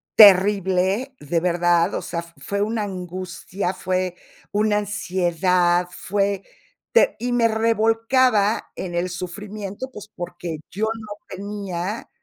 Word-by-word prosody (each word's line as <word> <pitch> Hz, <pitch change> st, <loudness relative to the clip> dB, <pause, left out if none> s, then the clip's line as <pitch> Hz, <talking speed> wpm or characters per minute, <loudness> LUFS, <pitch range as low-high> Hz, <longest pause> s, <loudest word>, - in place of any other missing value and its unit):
terrible, 195 Hz, +4 st, +5 dB
de 165 Hz, +4 st, 0 dB
verdad, 175 Hz, 0 st, +2 dB
o -, -, -1 dB
sea, 170 Hz, 0 st, -4 dB
fue 185 Hz, +4 st, -5 dB
una 215 Hz, +1 st, 0 dB
angustia, 185 Hz, -1 st, -4 dB
fue 185 Hz, -1 st, -1 dB, 0.4 s
una 210 Hz, 0 st, +2 dB
ansiedad, 180 Hz, -3 st, +1 dB
fue 200 Hz, +1 st, -1 dB, 0.5 s
te -, -, +4 dB
y 245 Hz, +2 st, -2 dB
me 235 Hz, -1 st, +4 dB
revolcaba 225 Hz, 0 st, +2 dB
en 175 Hz, -2 st, -5 dB
el 180 Hz, +1 st, 0 dB
sufrimiento, 200 Hz, +6 st, -6 dB
pues, 210 Hz, -3 st, -10 dB
porque 175 Hz, -2 st, -5 dB
yo 210 Hz, +4 st, -1 dB
no 220 Hz, -1 st, -4 dB
tenía, 200 Hz, 0 st, -5 dB
195 Hz, 120 wpm, -23 LUFS, 180-215 Hz, 0.5 s, terrible